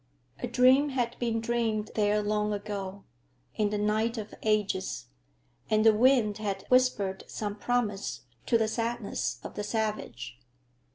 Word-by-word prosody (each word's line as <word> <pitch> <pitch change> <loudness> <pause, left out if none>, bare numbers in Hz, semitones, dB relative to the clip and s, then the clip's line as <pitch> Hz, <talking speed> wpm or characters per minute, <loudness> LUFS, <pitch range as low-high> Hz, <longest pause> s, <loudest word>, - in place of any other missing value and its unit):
A 245 - -1
dream 255 +4 +5
had 245 -3 -1
been 230 -2 0
dreamed 225 -2 -1
there 210 0 +2
long 210 0 0
ago, 200 -1 -5 0.5
in 210 -1 +1
the 210 - -1
night 215 +3 +1
of 215 -1 -6
ages, 210 -3 0 0.6
and 215 0 +3
the 220 - +8
wind 225 -2 +3
had 205 -2 -3
whispered 215 -7 +2
some 205 -1 -4
promise 210 -3 -1 0.3
to 230 - +4
the 220 -1 +1
sadness 220 - -2
of - - -7
the 210 - -4
savage. 205 - -3
215 Hz, 145 wpm, -29 LUFS, 205-235 Hz, 0.6 s, the